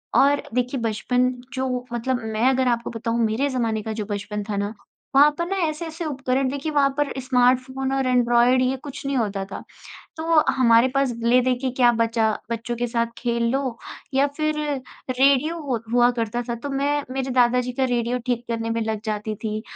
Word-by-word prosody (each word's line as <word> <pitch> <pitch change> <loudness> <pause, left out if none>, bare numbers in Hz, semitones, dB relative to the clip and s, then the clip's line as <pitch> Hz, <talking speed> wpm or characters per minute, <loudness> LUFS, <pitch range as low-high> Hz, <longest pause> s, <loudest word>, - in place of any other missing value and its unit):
और 285 +1 +4
देखिए 250 +2 0
बचपन 245 +3 +1 0.2
जो 255 -2 -2
मतलब 245 +1 -1
मैं 220 +2 0
अगर 260 -1 +2
आपको 235 -1 0
बताऊँ 230 0 -2
मेरे 225 +6 0
ज़माने 230 -4 -1
का 220 - -4
जो 215 -1 -4
बचपन 205 0 -4
था 205 0 -4
ना, 205 +1 -2 0.4
वहाँ 285 +2 +8
पर 340 - -1
ना 390 - -2
ऐसे-ऐसे 320 +2 -5
उपकरण 265 -2 0
देखिए 280 +3 -3
वहाँ 285 -2 +3
पर 290 -1 0
स्मार्टफ़ोन 255 +1 +1
और 270 -1 0
ऐंड्रॉइड 245 0 +4
ये 255 +1 +1
कुछ 285 +1 -9
नहीं 275 0 -1
होता 200 -4 -1
था। - - -6 0.5
तो 325 0 +3
हमारे 235 -1 +5
पास 275 -2 +2
ले 240 +2 +4
देके 255 +1 0
क्या 245 -1 +4
बचा, 230 -1 +1 0.2
बच्चों 230 +1 -3
के 245 +1 -1
साथ 235 0 0
खेल 235 -1 -1
लो 265 -3 -1 0.4
या 275 +1 +4
फिर 310 -1 0 0.5
रेडियो 275 +5 +3
हु 255 -4 0
हुआ 240 0 +5
करता 230 +2 -2
था। 235 - -1
तो 240 +5 -6
मैं 285 +2 0
मेरे 265 0 -3
दादा 250 0 +4
जी 250 0 -4
का 265 +2 0
रेडियो 240 0 0
ठीक 245 -1 -1
करने 230 -1 -2
में 230 0 -1
लग 220 -1 -2
जाती 215 0 -3
थी। 215 0 -2
250 Hz, 195 wpm, -23 LUFS, 230-270 Hz, 0.5 s, वहाँ